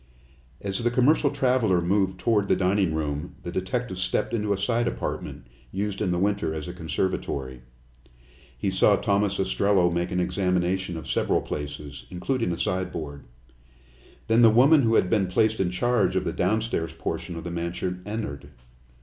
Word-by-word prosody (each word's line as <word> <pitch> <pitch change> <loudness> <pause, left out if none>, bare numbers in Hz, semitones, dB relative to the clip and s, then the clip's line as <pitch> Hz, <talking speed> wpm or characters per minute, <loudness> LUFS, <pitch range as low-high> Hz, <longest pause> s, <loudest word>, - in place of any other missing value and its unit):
As 95 -1 -2
the 120 0 +1
commercial 135 +5 +3
traveler 125 -9 +2
moved 95 +1 +1
toward 105 -2 +2
the - - +3
dining 95 -3 +1
room, 75 +1 -3
the 85 - -5
detective 95 +2 -3
stepped 90 - 0
into 105 -3 0
a 100 - +2
side 115 +4 0
apartment, - - -4 0.3
used 100 +1 -3
in 100 - +1
the 90 - 0
winter 95 -4 0
as 80 +1 -5
a 90 - -5
conservatory. 75 -6 -3 1.0
He 95 - -1
saw 100 +2 +4
Thomas 100 0 +1
Ostrello 95 -1 +2
make 85 +1 -1
an 90 - -1
examination 90 -1 0
of 80 - -8
several - - +1
places, 75 -3 -6
including 115 +3 -1
a 85 - -2
sideboard. 80 -7 -3 1.0
Then 115 +1 +4
the 115 - +8
woman 135 +7 +6
who 115 -2 +2
had 95 - +4
been 100 -1 +2
placed 110 +4 +1
in 95 -2 +1
charge 120 +7 +1
of - - 0
the - - -1
downstairs 105 -3 0
portion 85 - -4
of 85 - -6
the 85 - -5
mansion 90 +2 -3
entered. 100 -10 -5
95 Hz, 165 wpm, -25 LUFS, 85-110 Hz, 1.0 s, the